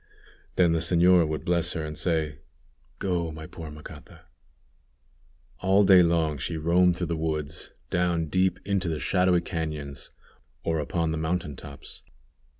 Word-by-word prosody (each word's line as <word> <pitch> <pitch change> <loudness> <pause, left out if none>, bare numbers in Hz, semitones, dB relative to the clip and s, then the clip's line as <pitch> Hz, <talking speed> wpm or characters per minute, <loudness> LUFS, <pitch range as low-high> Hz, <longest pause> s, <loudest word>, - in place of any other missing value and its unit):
Then 90 -2 +4
the 80 - +2
señora 85 0 +4
would 75 -2 -4
bless 85 0 +1
her, 80 -3 -3
and 75 0 -6
say, 80 -4 -1 0.6
"Go, 85 -4 -1
my 80 0 -8
poor 80 0 -9
Macata." 75 0 -12 1.4
All 95 +2 +4
day 95 -2 +7
long 80 -4 +1
she 80 +4 -3
roamed 85 +2 +3
through 85 -2 -2
woods, 80 -1 -3 0.2
down 85 -2 +1
deep 95 +3 +1
into 100 -2 0
the 80 -2 -2
shadowy 90 0 +2
cañons, 75 -5 -5 0.5
or 80 -1 0
upon 80 +2 -1
the 80 - -2
mountain 80 -2 -2
tops. 70 +1 -10
85 Hz, 145 wpm, -26 LUFS, 80-90 Hz, 1.4 s, day